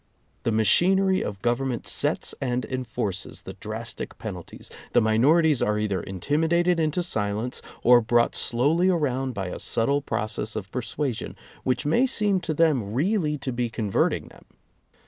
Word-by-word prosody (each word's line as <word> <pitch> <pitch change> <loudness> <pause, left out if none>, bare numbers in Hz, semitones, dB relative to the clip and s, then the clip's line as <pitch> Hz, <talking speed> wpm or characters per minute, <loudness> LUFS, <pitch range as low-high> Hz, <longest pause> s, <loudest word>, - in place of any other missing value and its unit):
The 115 - 0
machinery 185 - +4
of 100 -2 -6
government 120 0 -1
sets - - +1
and 125 -1 -1
enforces 110 -7 -4
the - - -8
drastic 110 +1 -6
pen 110 -3 -5
alties, 90 -2 -10 0.2
the - - +6
minorities 140 +7 +3
are 105 0 +1
either 105 -3 -1
intimidated 165 - +1
into 160 +2 0
silence, 110 - -2 0.2
or 120 0 +7
brought 120 +1 +2
slowly 150 +10 +2
around 135 -7 0
by 95 -2 -3
a - - -6
subtle 140 +5 +1
proc 110 -6 -3
ess 110 +1 -4
of 100 -2 -5
persuasion 125 0 -3 0.3
which 125 0 0
may 235 - +3
seem 210 -6 +1
to 170 -3 -3
them 145 -11 +2
really 155 - +1
to 135 -1 -4
be 120 0 -1
converting 105 -3 0
them. - - -18
125 Hz, 155 wpm, -25 LUFS, 110-160 Hz, 0.3 s, or